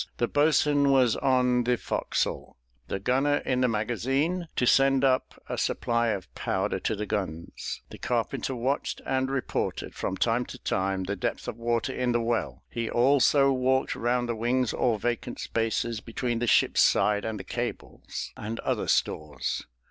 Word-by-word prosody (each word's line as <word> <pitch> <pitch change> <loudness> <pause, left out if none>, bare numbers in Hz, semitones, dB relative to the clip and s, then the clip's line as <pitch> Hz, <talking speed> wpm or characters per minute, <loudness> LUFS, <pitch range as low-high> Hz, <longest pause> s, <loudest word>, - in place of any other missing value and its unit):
The 120 - +1
boatswain 145 -1 +3
was 130 -4 +4
on 125 -2 +2
the 125 +1 +1
forecastle; - - -2 0.3
the - - -2
gunner 135 +7 +2
in 125 0 +1
the 125 - +4
magazine, 135 - 0
to 125 - +1
send 135 +1 +4
up 130 -1 +1
a - - -3
supply 115 0 0
of 100 -5 -3
powder 95 0 -1
to 110 - -1
the 105 +1 -3
guns; 95 -6 -4
the - - -10
carpenter 130 - -1
watched 130 +4 -1
and 130 0 0
reported, 135 -1 -2
from 95 - -3
time 120 +1 +1
to - - -8
time, 95 0 -1
the 100 +2 -2
depth 90 - -3
of - - -4
water 120 +2 -1
in 125 -1 0
the 120 - +2
well; 115 -3 -2
he 115 -1 -3
also 135 +2 +4
walked 130 0 +1
round 120 +1 0
the 120 - -1
wings 120 +2 0
or 115 -3 +1
vacant 120 +3 -3
spaces 115 0 -1
between 120 +1 -3
the 120 - -1
ship's - - +4
side 105 -1 +3
and 110 -2 -3
the - - -6
cables, - - -5
and 110 +2 -5
other - - -1
stores. 75 -4 -1
120 Hz, 170 wpm, -27 LUFS, 110-130 Hz, 0.3 s, was